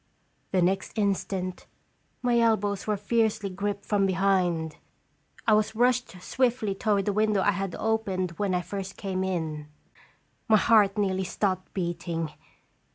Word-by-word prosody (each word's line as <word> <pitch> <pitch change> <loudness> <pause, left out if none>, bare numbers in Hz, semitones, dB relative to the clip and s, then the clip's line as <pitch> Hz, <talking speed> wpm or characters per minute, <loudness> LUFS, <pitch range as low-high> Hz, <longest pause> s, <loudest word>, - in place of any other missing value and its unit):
The 185 -2 +3
next 190 +4 -1
instant, 195 -3 -1 0.6
my 240 -1 +3
elbows 205 -3 +1
were 210 -1 +1
fiercely 210 -1 0
gripped 200 +2 -3
from 200 -2 +2
behind. 180 -4 +1 0.7
I 220 - +4
was 215 +1 +2
rushed 245 -4 +1
swiftly 240 -5 0
toward 200 0 0
the 205 - 0
window 215 -1 +2
I 205 - +4
had 195 -2 -3
opened 200 -5 -1
when 200 -3 +1
I 180 - +1
first 195 +2 -6
came 190 -2 -2
in. 160 -5 -3 0.8
My 220 -2 +6
heart 210 -2 +4
nearly 190 -2 +1
stopped 185 0 -1
beating. 170 -3 -2
195 Hz, 140 wpm, -27 LUFS, 185-215 Hz, 0.8 s, My